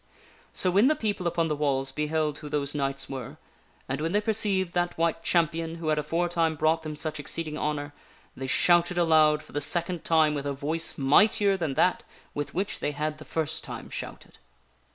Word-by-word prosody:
So 185 - +2
when 200 +7 +4
the 310 - +3
people 205 - -2
upon 165 -1 0
the 150 - -1
walls 135 -2 0
beheld 150 +1 -1
who 150 - -8
those 145 -1 -1
knights 135 -2 -1
were, 135 +2 -7 0.5
and 135 +2 -3
when 165 +3 -2
they 205 - +3
perceived 200 -5 +2
that 175 0 -1
White 165 0 0
Champion 165 -1 0
who 165 -2 -4
had 155 -1 +2
aforetime 165 +1 0
brought 155 +2 +1
them 155 -1 -6
such 155 0 -3
exceeding 155 +2 -4
honor, 145 -1 -3 0.4
they 135 - -5
shouted 175 +5 +4
aloud 155 -2 +4
for - - -16
the 145 - -2
second 170 +3 0
time 160 -2 +3
with 145 -1 -3
a 140 - -1
voice 155 +4 -2
mightier 200 +9 +4
than 160 -7 -3
that 185 - +2 0.3
with 145 0 -5
which 190 +3 -2
they 145 - -2
had 150 +1 -3
the 155 - -11
first 160 -2 -2
time - - -8
shouted. - - -8
155 Hz, 195 wpm, -27 LUFS, 150-175 Hz, 0.5 s, when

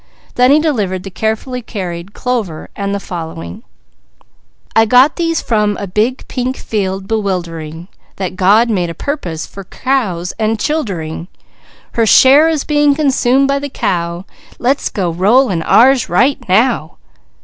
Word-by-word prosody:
Then 250 +1 +3
he 290 +2 +5
delivered 210 - -1
the 195 - -8
carefully 220 +5 -3
carried 185 -4 -6
clover 225 -11 -3
and 200 0 -3
the - - -2
following: 160 - -7 1.1
"_I 225 0 +5
got 255 +5 +5
these 330 -1 -1
from 210 -3 0
a 200 - -4
big, 215 +7 -1
pink 255 +1 -3
field 195 -2 -3
bewildering, 170 -6 -3 0.3
That 185 -2 -4
God 205 +6 +4
made 180 -5 0
a 165 - -6
purpose 180 - -4
for 195 - -10
cows 190 -7 -2
and 220 0 0
childering. 180 - -3 0.6
Her 230 -1 +1
share 280 +8 +6
is 310 -3 -1
being 295 -1 +2
consumed 275 -2 +2
by 275 0 +1
the 285 0 -5
cow, 170 -5 -2 0.3
Let's 265 +4 0
go 190 -8 -2
roll 210 +8 +3
in 170 -3 -1
ours 250 +8 +4
right 260 +11 +2
now. 215 -5 +1
215 Hz, 150 wpm, -15 LUFS, 180-260 Hz, 1.1 s, share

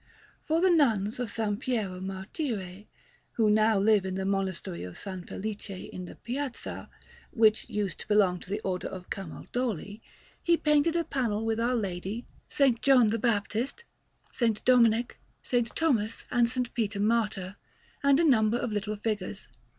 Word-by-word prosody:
For 320 +2 +1
the 370 0 +5
Nuns 225 - +2
of 245 -3 -2
S. 215 -2 0
Piero 215 -8 -2
Martire 195 - -4 0.5
who 220 -2 +3
now 215 0 +4
live 205 0 +4
in 190 -1 -3
the 190 0 -2
Monastery 190 - -2
of 90 -1 -8
S. - - -7 0.2
Felice 210 +1 -5
in 185 -1 -7
Piazza, 260 +2 -5 0.4
which 220 -2 +3
used 205 -2 -2
to - - -8
belong 195 -4 +3
to 180 - -12
the 205 +2 -1
Order 185 -3 -2
of 185 -1 -9
Camaldoli 205 +2 -4 0.4
he 340 -1 +3
painted 300 +2 +3
a 340 - +2
panel 230 -8 -1
with 225 0 0
Our 240 +2 +1
Lady, 200 +2 -3 0.2
S. 275 -3 +4
John 255 -5 +5
the 230 - 0
Baptist, 230 - -1 0.6
S. 225 -3 +2
Dominic, 240 -1 +4 0.3
S. 240 -2 +1
Thomas, 230 -9 0
and 240 -1 +4
S. 255 +2 -6 0.2
Peter 215 -3 -1
Martyr, 210 -3 0 0.4
and 280 +1 +4
a - - +4
number 225 -5 +4
of 240 -2 -2
little 210 0 -2
figures. 210 -2 -4
220 Hz, 160 wpm, -28 LUFS, 200-245 Hz, 0.6 s, the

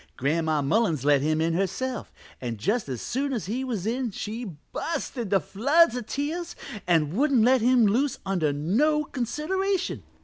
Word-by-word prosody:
Gran'ma 155 +1 +1
Mullins 160 - +1
let 145 -2 +4
him 155 +2 +1
in 165 +1 +1
herself, 195 +7 -2 0.3
and 120 -3 -3
just 205 - -1
as 125 -4 -4
soon 275 +2 -1
as 230 - -2
he 235 +7 -2
was 225 -8 -3
in 245 +2 -1
she 220 +3 -5 0.3
bu'st 330 - -3
into 205 -6 +1
floods 260 - +3
of 245 -3 -5
tears 320 +5 -3 0.3
an' 160 -2 +2
wouldn't 270 -2 +3
let 255 +1 +4
him 245 0 +5
loose 250 +7 +1
under 180 -6 +1
no 235 - +2
consideration. 345 - -2
225 Hz, 165 wpm, -26 LUFS, 165-265 Hz, 0.3 s, him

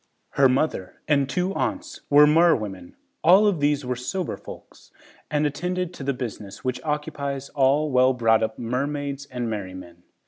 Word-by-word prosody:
Her 135 -1 +4
mother 130 -8 -1
and 140 -3 +2
two 180 +7 -1
aunts 300 +8 -3
were 145 +1 +7
merwomen. 115 - +2 0.3
All 185 +6 +6
of 200 -6 +2
these 145 -1 +1
were 125 0 -2
sober 160 +8 -3
folks - - -13 0.4
and 150 0 +1
attended 180 +4 -2
to 145 - -8
the 140 - 0
business 110 -6 -7
which 125 -1 -2
occupies 140 -2 -3
all 140 +2 +2
well 130 0 +4
brought 115 -2 +3
up 110 0 -2
mermaids 140 +3 -3
and 125 -3 -4
merrymen. 95 -5 -7
140 Hz, 160 wpm, -24 LUFS, 120-150 Hz, 0.4 s, were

